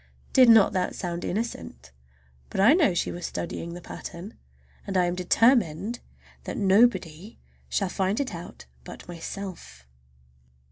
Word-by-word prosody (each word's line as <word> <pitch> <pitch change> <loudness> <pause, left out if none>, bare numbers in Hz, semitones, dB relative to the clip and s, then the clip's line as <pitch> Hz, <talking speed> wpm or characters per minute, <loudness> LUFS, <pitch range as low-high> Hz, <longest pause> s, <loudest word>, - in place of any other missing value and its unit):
Did 255 -3 +7
not 225 -3 +6
that 185 -1 -1
sound 175 -1 -4
innocent? 180 - -5 0.6
But - - -5
I 215 +9 +7
know 310 - +3
she - - -1
was 175 - -8
studying 170 0 -5
that 175 - -10
pattern, 180 +6 -8 0.5
and 195 -1 -1
I 180 - +3
am 175 - -1
determined 210 - +2 0.5
that - - -5
nobody 200 -2 +2 0.3
shall 195 - 0
find 190 +2 -1
it 280 -7 -2
out 170 0 -9 0.2
but - - -11
myself! 170 - -8
190 Hz, 140 wpm, -26 LUFS, 175-220 Hz, 0.6 s, Did